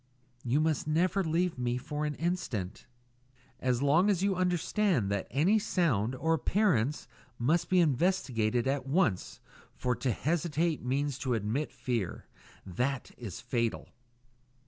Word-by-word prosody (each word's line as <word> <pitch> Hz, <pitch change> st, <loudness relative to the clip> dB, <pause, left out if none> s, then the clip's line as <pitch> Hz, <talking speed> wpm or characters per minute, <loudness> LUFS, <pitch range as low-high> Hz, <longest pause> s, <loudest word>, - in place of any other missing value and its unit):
"You 130 Hz, +4 st, +1 dB
must 155 Hz, -1 st, 0 dB
never 180 Hz, +5 st, +2 dB
leave 165 Hz, -2 st, 0 dB
me 120 Hz, -1 st, 0 dB
alone 125 Hz, -, -2 dB
for 150 Hz, +1 st, -2 dB
an 150 Hz, -, -3 dB
instant." 160 Hz, -, -3 dB, 0.7 s
"As 125 Hz, 0 st, 0 dB
long 165 Hz, +8 st, +4 dB
as 190 Hz, -2 st, +1 dB
you 200 Hz, -1 st, +2 dB
understand 180 Hz, -, +1 dB
that 100 Hz, -1 st, -1 dB
any 175 Hz, -, +3 dB
sound 130 Hz, -, +1 dB
or 160 Hz, +5 st, +1 dB
appearance 160 Hz, -, +1 dB, 0.3 s
must 155 Hz, +8 st, +1 dB
be 185 Hz, -, +4 dB
investigated 130 Hz, -, +1 dB
at 135 Hz, 0 st, -1 dB
once, 115 Hz, -, 0 dB, 0.4 s
for 125 Hz, -1 st, -1 dB
to 125 Hz, +1 st, 0 dB
hesitate 160 Hz, -, 0 dB
means 140 Hz, +2 st, -1 dB
to 125 Hz, -3 st, 0 dB
admit 115 Hz, +8 st, -2 dB
fear. 120 Hz, -8 st, -3 dB, 0.4 s
That 125 Hz, +9 st, -2 dB
is 110 Hz, -8 st, -7 dB
fatal." 115 Hz, -2 st, -2 dB
145 Hz, 140 wpm, -30 LUFS, 120-175 Hz, 0.7 s, long